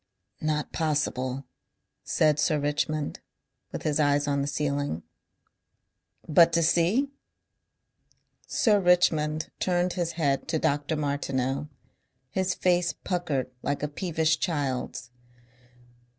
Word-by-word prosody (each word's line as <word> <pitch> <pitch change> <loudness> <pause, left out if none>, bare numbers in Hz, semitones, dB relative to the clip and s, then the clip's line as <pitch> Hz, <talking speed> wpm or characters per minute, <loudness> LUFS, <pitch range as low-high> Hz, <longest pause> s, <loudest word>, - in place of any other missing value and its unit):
"Not 155 -1 -1
possible," 135 -4 -1 0.6
said 150 -1 +2
Sir 155 0 +2
Richmond, 150 +1 -1 0.5
with - - -5
his 155 -1 +1
eyes 145 -1 +2
on 140 -1 +1
the 140 - -1
ceiling. 145 - -2 1.2
"But 165 +2 +6
to 170 - +3
see?" 185 - +2 1.4
Sir 210 -3 +3
Richmond 160 -4 +2
turned 180 0 +1
his 170 -2 -2
head 145 -4 0
to 160 0 0
Dr. 145 +1 0
Martineau. 140 -1 -1 0.6
His 185 +3 0
face 180 -1 +2
puckered 155 -9 -2
like 145 +1 -2
a - - +1
peevish 160 0 0
child's. 140 -8 -2
150 Hz, 110 wpm, -27 LUFS, 145-170 Hz, 1.4 s, But